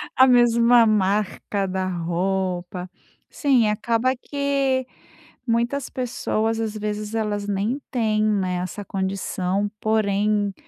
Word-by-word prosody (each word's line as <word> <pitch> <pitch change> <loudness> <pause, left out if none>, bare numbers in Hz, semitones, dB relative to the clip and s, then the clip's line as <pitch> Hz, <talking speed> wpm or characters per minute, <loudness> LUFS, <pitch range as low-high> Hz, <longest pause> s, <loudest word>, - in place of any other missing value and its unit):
A 260 - +7
mesma 240 -1 +5
marca 205 -1 0
da 185 0 -2
roupa, 180 +1 -2 0.4
sim, 260 -6 +3
acaba 230 +4 +1
que 275 -1 -1 0.6
muitas 240 +3 0
pessoas, 225 -3 -1
às 225 -1 -2
vezes, 210 0 -4
elas 210 -2 -1
nem 205 +6 -1
têm, 215 -3 +1
né, 195 -4 +1
essa 185 +3 -5
condição, 190 0 -2
porém, 210 -1 +1
215 Hz, 105 wpm, -23 LUFS, 195-235 Hz, 0.6 s, A